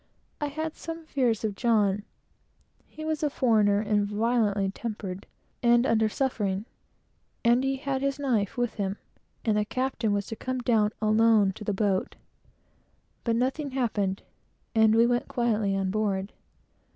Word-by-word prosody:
I 295 - -1
had 315 +2 -4
some 330 0 -7
fears 245 -8 0
of 215 -2 -1
John. 210 -3 +2 0.9
He 310 - -9
was 315 -1 -1
a 300 - +1
foreigner, 215 -7 +3
and 210 -1 +1
violently 210 -2 +1
tempered, 200 -3 -6 0.3
and 240 0 +4
under 220 -2 +3
suffering; 210 -6 -1 0.8
and 240 +2 +4
he 270 0 +1
had 270 0 -2
his 275 0 0
knife 240 -9 0
with 245 -1 0
him, 200 0 -3 0.5
and 215 -2 +2
the 210 - 0
captain 255 -2 -1
was 205 -1 0
to 225 - -6
come 255 +3 -3
down 225 -4 +2
alone 215 -2 +4
to 210 - -9
the 210 - -1
boat. 195 -1 0 1.1
But 230 -1 +1
nothing 265 +5 -1
happened; 205 -7 -1 0.5
and 220 -1 +5
we 230 +1 +6
went 245 0 +1
quietly 220 -5 0
on 195 -1 -1
board. 200 -2 -1
225 Hz, 150 wpm, -27 LUFS, 205-255 Hz, 1.1 s, we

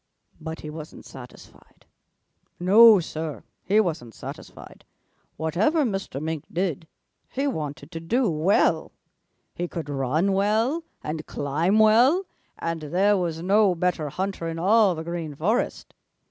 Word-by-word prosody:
"But 160 +1 -7
he 150 - -7
wasn't 155 0 -10
satisfied. 125 -2 -14 0.7
No, 210 +4 +7
Sir, 160 -3 -5 0.2
he 205 +3 +3
wasn't 160 - -2
satisfied. - - -10 0.5
Whatever 200 - +1
Mr. 195 - -3
Mink 155 0 -4
did, 170 -3 -2 0.4
he 275 +2 -2
wanted 150 - -4
to 165 - -5
do 230 +10 0
well. 170 +4 +1 0.6
He 175 - -3
could 165 -4 -6
run 145 +8 0
well 220 +11 +1 0.2
and 155 +1 -4
climb 160 +8 0
well, 240 - +5 0.3
and 165 -1 -3
there 185 +7 +2
was 170 -3 -2
no 200 0 +3
better 165 -3 -1
hunter 185 +1 -3
in 165 0 -4
all 200 +2 +4
the 160 - -5
Green 165 -3 -5
Forest. 210 - -1
175 Hz, 130 wpm, -24 LUFS, 155-205 Hz, 0.7 s, No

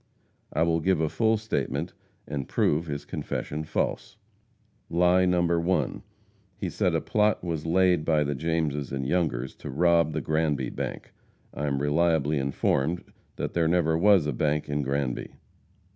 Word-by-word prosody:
I 80 - +1
will 85 0 +2
give 90 +1 +1
a 80 -1 +1
full 110 +4 +2
statement 110 +1 -2 0.3
and 70 -2 -4
prove 80 +3 +1
his 70 -1 -4
confession 75 +2 -4
false. 75 - -2 0.7
Lie 90 +2 +4
No. 90 -1 +2
1. 85 +2 0 0.6
He - - -3
said - - +1
a - - +1
plot 105 -2 +1
was 80 -3 -3
laid 90 -1 +3
by 75 -2 +2
the 75 0 -1
Jameses 75 -2 -1
and 70 -1 -3
Youngers 65 -7 0
to - - -8
rob 85 +2 +3
the - - -2
Granby 80 -2 0
bank. - - -6 0.4
I 75 - -3
am 70 0 -1
reliably 75 -1 +2
informed 70 +4 0 0.3
that - - -4
there 85 -2 +2
never 80 -1 +2
was 95 -1 +5
a 75 - -1
bank 75 +4 0
in 75 0 -1
Granby. 70 -2 -2
80 Hz, 160 wpm, -27 LUFS, 75-85 Hz, 0.7 s, was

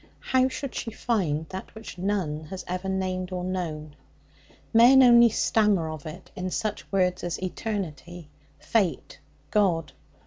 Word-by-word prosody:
How 260 0 +4
should 265 0 -5
she 230 - -4
find 180 -10 -1
that 190 +3 -8
which 220 -4 -9
none 175 -6 -2
has 185 +4 -7
ever 185 +2 -3
named 185 -1 -2
or 180 -1 -3
known? 160 -5 -4 0.8
Men 250 +4 +8
only 235 -1 +7
stammer 210 -7 +2
of 155 -1 -8
it 155 - -10
in 185 0 -3
such 215 +3 -4
words 180 -2 +1
as 175 -1 -2
Eternity, 175 -4 -5 0.3
Fate, 200 -7 -1 0.3
God. 170 -8 +1
185 Hz, 140 wpm, -26 LUFS, 170-215 Hz, 0.8 s, Men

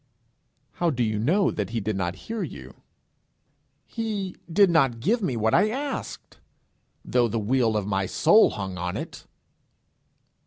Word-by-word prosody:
How 175 - 0
do 125 -6 0
you 110 -2 -1
know 175 - +2
that 100 -3 -3
he 115 - -2
did 110 0 -2
not 90 -2 -2
hear 225 -1 -4
you? - - -8 1.0
'He 210 -5 -4 0.2
did 195 +1 +5
not 135 -8 +2
give 220 - +1
me 135 - -1
what 110 0 +1
I 210 +4 +4
asked, 275 +5 -5 0.7
though 120 -1 +2
the 115 - -3
weal 115 0 +1
of 105 - -2
my 95 -2 -1
soul 220 - +5
hung 95 -3 -5
on 90 0 -3
it.' - - -8
120 Hz, 155 wpm, -25 LUFS, -, 1.0 s, did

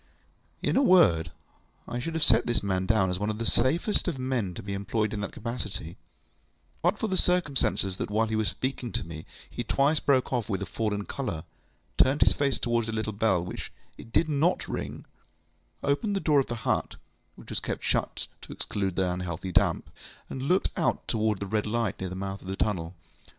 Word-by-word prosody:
In - - +2
a 270 - +5
word, 125 - +5 0.6
I 120 - -3
should 160 +6 -3
have 160 - +2
set 120 -4 +5
this 120 -3 +1
man 95 -1 0
down 100 -5 +3
as 90 - -1
one 105 +1 0
of 105 - -2
the 115 - -3
safest 160 - +2
of 170 -6 -1
men 125 -8 -1
to - - -7
be 100 0 -4
employed 100 +2 -1
in 105 - -2
that 100 - -3
capacity, 105 -8 -5 0.9
but 175 +5 +2
for 220 - -1
the 190 - 0
circumstance 165 - +2
that - - -3
while 110 +2 +2
he 110 0 -2
was 110 -1 +2
speaking 130 -2 -3
to - - -1
me 80 -1 -8 0.2
he 120 - -4
twice 140 +6 +2
broke 130 -2 +2
off 120 -4 0
with 100 -1 -1
a - - -3
fallen 105 +2 -2
colour, 85 - -3 0.6
turned 135 +3 +5
his - - +6
face 140 -4 +1
towards 120 -1 0
the 115 - -3
little 110 -1 -2
bell 100 -4 +2
when - - -6 0.4
it 115 - -12
did 160 - +3
NOT 155 +4 +1
ring, - - -5 0.8
opened 200 +9 +1
the - - +1
door 150 -6 +4
of 135 - +1
the 120 - -3
hut - - 0 0.4
(which - - -12
was - - 0
kept - - -4
shut - - 0 0.2
to - - -10
exclude 95 -3 -2
the 95 -1 +2
unhealthy 90 0 -3
damp), - - +2 0.4
and 130 - -4
looked 180 +8 +2
out - - 0
towards 110 -3 +1
the - - -1
red 105 +2 0
light 115 -2 -1
near 95 - -3
the 90 - -6
mouth 95 +1 -4
of - - -12
the 95 - -2
tunnel. 90 -5 -1
110 Hz, 210 wpm, -28 LUFS, 95-135 Hz, 0.9 s, his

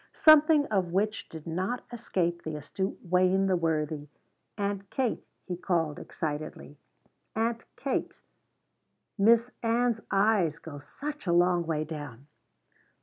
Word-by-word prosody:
Something 310 -1 +6
of 185 -4 +1
which 210 +4 -1
did 160 -2 -9
not 185 +9 -2
escape 175 -7 -1
the 155 -1 -5
astute 190 +6 -3
Wayne 185 +1 +3
the 190 -1 +2
Worthy. 155 -3 -1 0.5
"Aunt 200 -1 -2
Kate," 255 -4 -1 0.2
he 180 - -3
called 170 -4 -1
excitedly, 150 -2 -5 0.6
"Aunt 230 +1 -1
Kate 270 +1 -2 1.0
Miss 230 +4 +5
Ann's 235 0 +1
eyes 195 -6 +3
go 155 -3 -9
such 290 - -7
a 170 - +3
long 175 -1 +3
way 155 -2 0
down!" 145 -5 -8
185 Hz, 125 wpm, -29 LUFS, 160-225 Hz, 1.0 s, Something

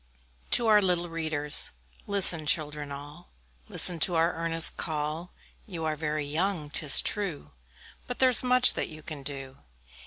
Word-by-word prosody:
TO 240 - +2
OUR 215 -2 +3
LITTLE 175 -2 -2
READERS. 155 -3 +1 0.4
Listen, 195 -4 +7
little 155 - -11
children, 150 -2 -6
all, 145 +5 -12 0.4
Listen 175 -2 +3
to 175 +2 0
our 165 +1 -1
earnest 165 0 0
call: 155 +2 -6 0.4
You 170 -5 -8
are 155 -1 -4
very 150 -1 -5
young, 155 0 -4
'tis 150 -2 +5
true, 180 - -5 0.6
But 245 - -7
there's 255 -2 +4
much 250 0 +2
that - - -5
you 155 -1 -14
can 150 -3 -10
do. 135 -1 -9
160 Hz, 155 wpm, -25 LUFS, 150-180 Hz, 0.6 s, Listen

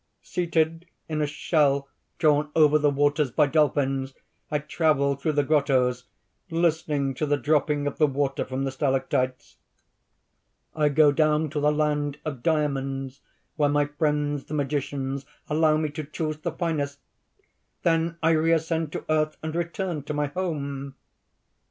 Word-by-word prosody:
"Seated 165 -1 -1 0.2
in 155 -1 -2
a 150 - +1
shell 145 -2 +1 0.3
drawn 150 -1 +3
over 155 -1 +5
the 145 0 +3
waters 145 0 +2
by 150 +5 +3
dolphins, 135 -2 +1 0.3
I 150 - +1
travel 150 -2 +1
through 145 +3 -1
the 145 0 +2
grottoes, 130 -4 +2 0.4
listening 160 -5 0
lo 155 - +1
the 145 0 +2
dropping 150 0 +1
of 145 - -3
the 155 - +5
water 140 0 -1
from 130 +1 -3
the 135 - -1
stalactites. 130 -2 -1 1.2
I 150 -1 +3
go 150 0 +5
down 155 0 +2
to 155 - -2
the 150 +1 +3
land 150 -1 0
of 140 -6 -4
diamonds, 135 -3 -1 0.4
where 145 -2 +3
my 145 0 +2
friends 145 -1 -1
the 155 - -5
magicians 140 -1 -2 0.2
allow 155 0 +3
me 155 -1 -1
to 150 +1 -5
choose 155 +1 -4
the 170 +2 -3
finest: 150 -5 -2 0.9
then 165 0 +1
I 160 - +4
reascend 160 0 +1
to - - -5
earth 155 0 +1
and 160 0 -3
return 170 -1 -2
to 150 - -3
my 150 0 +1
home." 140 -4 -4
150 Hz, 150 wpm, -25 LUFS, 140-155 Hz, 1.2 s, over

